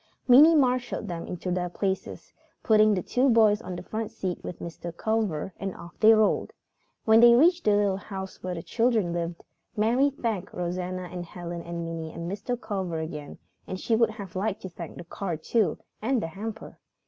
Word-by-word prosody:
Minnie 295 +6 +8
marshalled 250 -5 +1
them 170 -2 -5
into 180 0 -4
their 180 0 -1
places, 190 +2 -4 0.3
putting 215 -1 +5
the 185 - -2
two 260 +2 +2
boys 220 -3 +5
on 185 - -6
the 175 - -7
front 220 +3 -4
seat 185 -2 -4
with 175 - -6
Mr. 170 0 -7
Culver, 210 -6 -1
and 195 -1 -4
off 170 - -11
they 220 0 +7
rolled. 215 -1 +3 0.5
When 220 0 +6
they 235 0 +8
reached 340 +7 +4
the 210 -1 +4
little 200 -2 +2
house 190 -1 -7
where 180 -1 -3
the 165 - -6
children 225 -7 +1
lived, 170 0 -4 0.3
Mary 240 +7 +3
thanked 225 -8 -4
Rosanna 180 +1 -3
and 180 -1 -5
Helen 175 0 -7
and 170 0 -5
Minnie 165 -1 -5
and 170 +1 -6
Mr. 220 +6 -3
Culver 190 -7 -3
again 155 -2 -6 0.3
and 185 - -5
she 225 - +1
would 230 0 +3
have 200 -4 -9
liked 200 +2 -2
to 190 - -5
thank 170 -2 -9
the 175 - -7
car 175 0 -4
too, 190 +1 +1 0.2
and 250 +3 +1
the 165 - -3
hamper. 215 +5 -7
195 Hz, 195 wpm, -27 LUFS, 175-225 Hz, 0.5 s, Minnie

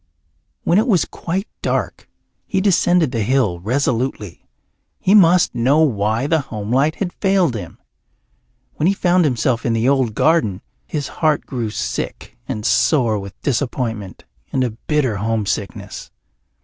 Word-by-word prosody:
When 175 - +3
it 225 - +1
was 190 -8 +3
quite 190 +5 -4
dark - - -2 0.4
he 195 - 0
descended 180 -5 +3
the 115 -3 -1
hill 105 -6 +1
resolutely. 115 -2 -2 0.5
He 190 - +2
must 180 -3 +5
know 135 +6 +3
why 110 -3 +1
the 160 +2 +2
homelight 125 +6 -1
had 180 -3 -3
failed 190 - +2
him. 95 -6 -7 1.0
When 155 - +1
he 195 - +2
found 180 -2 +3
himself 120 -3 0
in 115 - 0
the 115 +2 +1
old 130 -5 +2
garden 115 - +2 0.2
his 145 -3 -3
heart 155 -2 +2
grew 120 -4 -3
sick 105 - -4
and 110 -6 -4
sore 120 -9 +2
with 100 0 -10
disappointment 115 - -2 0.3
and 130 - +1
a 125 - -1
bitter 130 0 -1
homesickness. 105 -2 -3
130 Hz, 140 wpm, -19 LUFS, 110-160 Hz, 1.0 s, must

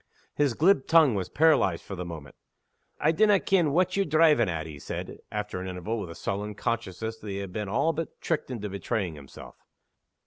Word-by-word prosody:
His 145 -5 +1
glib 165 -4 +3
tongue 160 -6 +6
was 95 -3 -2
paralyzed 150 - +3
for 95 - -7
the 90 - -5
moment. 80 -5 -8 0.7
"I 155 - +3
dinna 205 +4 +4
ken 175 -6 +2
what 185 +4 +2
ye're 200 - +3
drivin' 155 - +4
at," 80 -2 -3
he 75 -3 -9
said, - - -6
after 105 -3 -4
an 95 - -5
interval, 95 +5 -3
with 95 - -5
a 85 - -8
sullen 105 +1 -4
consciousness 110 0 -3
that 105 - -8
he 100 - -3
had 100 -2 -6
been 105 -2 -3
all 155 +10 +1
but 160 +1 -5
tricked 165 -5 -2
into 115 -5 -4
betraying 100 -2 -2
himself. 70 -3 -12
110 Hz, 200 wpm, -27 LUFS, 95-155 Hz, 0.7 s, tongue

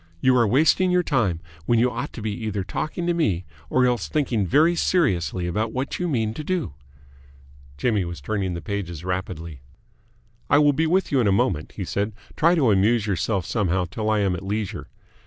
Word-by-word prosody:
You 130 +5 +3
are 120 -3 +4
wasting 155 - +3
your 180 0 +3
time, 105 - 0 0.3
when 120 - +3
you 125 +2 +3
ought 145 - -4
to 110 - -7
be 110 - -1
either 105 -2 -3
talking 155 - -4
to 175 - +1
me 100 - 0 0.2
or 130 0 +3
else 120 -4 0
thinking 120 - 0
very 160 - +4
seriously 90 - +1
about 110 +6 -2
what 130 +2 -3
you 180 - -1
mean 110 -8 0
to 155 - -6
do." 175 - -2 1.0
Jimmy 105 - +1
was 85 -2 -6
turning 95 +3 -2
the 85 - -6
pages 90 -5 -4
rapidly. 85 -5 -4 0.9
"I 145 - +5
will 145 -1 +5
be 160 +3 +1
with 185 +3 +1
you 140 - +3
in 115 - +3
a - - +4
moment," 100 -7 0
he - - -5
said. 105 +2 -2 0.2
"Try 170 +3 +4
to 135 -9 +3
amuse 105 +3 +3
yourself 95 -1 -1
somehow 95 -1 0
till 105 +5 -3
I 110 -1 +2
am 95 -3 +1
at 90 - -6
leisure. 100 +1 -4
110 Hz, 200 wpm, -23 LUFS, 95-140 Hz, 1.0 s, I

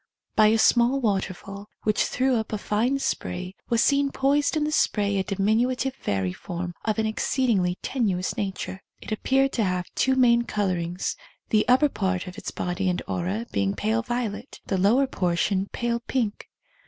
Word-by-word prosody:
By 215 -1 +6
a 220 +1 +4
small 240 +4 +4
waterfall, 200 -2 -3
which 215 -1 +2
threw 260 0 +1
up 220 -1 -2
a 215 - -1
fine 225 +6 0
spray, 185 -8 -3 0.2
was 235 -1 +3
seen 280 0 +3
poised 285 +3 +2
in 305 - +1
the 300 - -1
spray 205 -8 +1
a - - +1
diminutive 225 +7 +1
fairy 95 - -2
form 175 - -5
of 215 -1 0
an 220 - +1
exceedingly 215 -4 +1
tenuous 195 -8 -1
nature. 190 -1 -4 0.2
It - - -10
appeared 270 +5 +2
to 230 - 0
have 180 -2 -1
two 265 0 +2
main 240 -2 +5
colourings, 185 -6 -2 0.3
the 215 -1 +2
upper 255 +4 +5
part 190 -8 -2
of 180 - -8
its - - -6
body 180 +2 -2
and 180 - -1
aura 190 +6 -2
being 100 0 0
pale 220 +2 0
violet, 240 -1 -4
the 190 - -1
lower 230 +9 +4
portion 190 -3 0
pale 235 -1 -1
pink. 235 -3 -2
215 Hz, 170 wpm, -25 LUFS, 185-245 Hz, 0.3 s, By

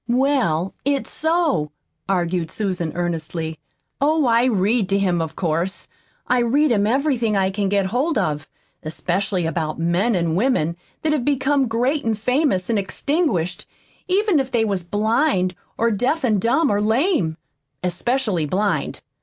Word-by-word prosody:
"Well, 240 - +1
it's 280 +1 -1
so," 320 - +1 0.4
argued 175 -3 0
Susan 180 -6 -2
earnestly. 165 -2 -3 0.4
"Oh, 305 +1 +3
I 235 0 +4
read 215 -2 +1
to 195 - +2
him, 180 -4 +1
of 160 -1 -4
course. 170 +2 -2 0.4
I 250 - +2
read 275 +5 +2
him 205 -2 +2
everything 245 -4 +1
I 190 0 +1
can 200 0 -1
get 200 -1 +2
hold 255 - 0
of, 155 -6 -1 0.3
especially 180 +3 -1
about 160 -1 -2
men 175 +7 +1
an' 170 -2 0
women 180 - +1 0.3
that 310 -1 +2
have 290 -5 0
become 275 0 +1
great 250 +6 0
an' 225 -1 0
famous 250 - +1
an' 225 -3 +1
extinguished, 195 - -1 0.4
even 390 -2 +3
if 265 -1 -1
they 235 -3 +1
was 200 -3 -1
blind 205 - +1 0.2
or 230 0 +2
deaf 255 +8 0
an' 215 -4 +2
dumb, 245 - +2
or 205 0 +1
lame 220 - +1 0.5
especially 185 - 0
blind. 200 +6 -1
210 Hz, 150 wpm, -21 LUFS, 175-265 Hz, 0.5 s, I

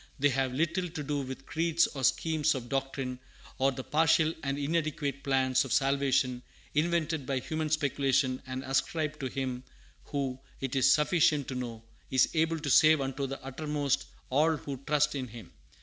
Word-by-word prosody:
They 145 0 +3
have 135 -1 0
little 170 +6 0
to 160 -3 -5
do 145 0 -1
with 130 0 -7
creeds, 165 +1 +2
or 135 -2 -6
schemes 155 +2 +2
of 120 -2 -6
doctrine, 135 -2 -2 0.4
or 135 +1 +3
the 130 0 -6
partial 160 +1 +3
and 140 -1 -2
inadequate 145 -2 -1
plans 130 -1 +2
of 135 - -7
salvation 135 -2 +2 0.3
invented 160 -2 0
by 135 - 0
human 155 +4 -2
speculation 135 -3 +1
and 130 0 -4
ascribed 150 +3 -1
to 135 - -2
Him 130 -1 -3 0.4
who, 135 -3 -3 0.2
it 135 0 -3
is 135 0 +5
sufficient 150 -2 +3
to - - -3
know, 120 -3 -5 0.3
is 130 -1 +4
able 165 0 +1
to 145 - -3
save 155 +3 +6
unto 135 0 -2
the 135 +1 -5
uttermost 140 0 -1 0.2
all 155 +4 +3
who 140 -1 -6
trust 150 0 +2
in 135 -3 -3
Him. 110 -5 -11
140 Hz, 170 wpm, -30 LUFS, 130-155 Hz, 0.4 s, save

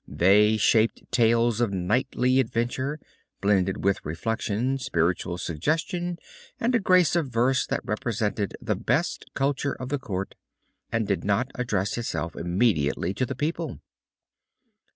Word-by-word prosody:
They 100 +8 +4
shaped 110 +1 +3
tales 115 -1 +3
of 115 -4 +1
knightly 125 +7 +1
adventure, 130 +4 -1 0.4
blended 100 -1 +1
with 100 0 +1
reflection, 115 - -2
spiritual 85 -4 0
suggestion, 165 - -2 0.4
and 240 +2 +1
a 235 - +4
grace 185 -3 +4
of 165 -4 +1
verse 125 +2 +1
that - - -1
represented 105 -2 -2
the - - -1
best - - -1
culture 140 0 0
of 130 - -7
the 145 0 -1
court, 100 -8 -4 0.6
and 115 -1 0
did 100 - -1
not 105 +6 0
address 105 -4 -1
itself 85 -7 -3
immediately 85 -2 +1
to 125 +5 -1
the 135 - -4
people. 150 +6 -2
115 Hz, 130 wpm, -26 LUFS, 100-130 Hz, 0.6 s, They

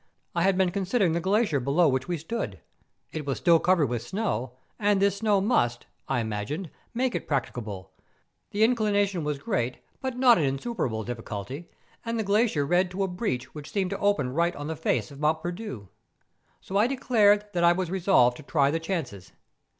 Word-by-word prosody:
I 170 - 0
had 190 +1 +3
been 185 -2 +2
considering 195 -1 +1
the 170 - +1
glacier 195 -3 +2
below 140 +7 +3
which 130 -2 0
we 175 -1 -1
stood. 225 +10 -4 0.5
It 155 - -4
was 135 - -1
still 170 -1 +5
covered 180 -3 +3
with 120 -3 -2
snow; 130 - -2 0.3
and 205 -2 +3
this 200 0 +2
snow 210 -1 +2
must, 120 - +1 0.2
I 125 -3 0
imagined, 115 - -4 0.2
make 250 0 0
it - - -4
practicable; 110 - -3 0.6
the 210 +2 +1
inclination 205 -6 +2
was 150 -1 -1
great, 125 -2 -2 0.2
but 260 -2 -3
not 250 -4 +6
an - - +1
insuperable 135 - -2
difficulty; 120 - -6 0.3
and 230 0 -2
the 220 - 0
glacier 205 -7 +2
led 180 +3 +2
to 190 +2 -2
a - - 0
breach 180 - -3
which 150 -1 -9
seemed 190 -3 -1
to 195 - -3
open 150 -11 +1
right 170 +3 +1
on 145 - -6
the 160 +2 -3
face 120 -6 -1
of 140 - -11
Mont 155 +1 +1
Perdu. 175 - -5 0.7
So 195 - -3
I 215 +3 +4
declared 215 -6 +3
that 175 -1 0
I 170 0 +6
was 180 -1 -2
resolved 175 -10 +3
to - - -10
try 140 -1 +2
the 165 - 0
chances. 160 - -5
175 Hz, 190 wpm, -27 LUFS, 135-205 Hz, 0.7 s, not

